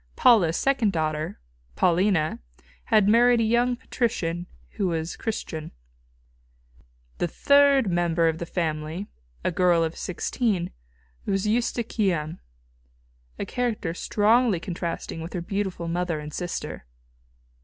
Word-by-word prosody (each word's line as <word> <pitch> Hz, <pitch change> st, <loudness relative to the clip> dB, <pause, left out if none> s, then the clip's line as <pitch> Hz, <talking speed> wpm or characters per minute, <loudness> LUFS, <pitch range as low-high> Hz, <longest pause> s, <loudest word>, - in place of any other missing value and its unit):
Paula's 190 Hz, -10 st, +5 dB
second 255 Hz, -7 st, +2 dB
daughter, 155 Hz, -, -2 dB, 0.4 s
Paulina, 175 Hz, -2 st, +2 dB, 0.5 s
had 210 Hz, -2 st, +4 dB
married 240 Hz, +2 st, +5 dB
a -, -, +3 dB
young 240 Hz, +2 st, +2 dB
patrician 180 Hz, -9 st, -2 dB, 0.2 s
who 195 Hz, -, -1 dB
was 165 Hz, -1 st, -2 dB
Christian. 160 Hz, -8 st, -4 dB, 1.5 s
The 175 Hz, -, +1 dB
third 280 Hz, -, +4 dB
member 170 Hz, -2 st, +2 dB
of 160 Hz, 0 st, 0 dB
the 170 Hz, -, -5 dB
family, 160 Hz, +2 st, -2 dB, 0.4 s
a -, -, +1 dB
girl 175 Hz, -1 st, +3 dB
of 160 Hz, 0 st, -2 dB
sixteen, 190 Hz, 0 st, -1 dB, 0.6 s
was 195 Hz, 0 st, 0 dB
Eustochium, 210 Hz, -8 st, 0 dB, 1.0 s
a -, -, -3 dB
character 230 Hz, -9 st, -2 dB
strongly 215 Hz, +2 st, +2 dB
contrasting 170 Hz, -2 st, -4 dB
with 165 Hz, -, -7 dB
her 180 Hz, -, -2 dB
beautiful 190 Hz, -2 st, -3 dB
mother 170 Hz, -1 st, -1 dB
and 150 Hz, 0 st, -8 dB
sister. 175 Hz, -, -5 dB
180 Hz, 115 wpm, -25 LUFS, 165-225 Hz, 1.5 s, Paula's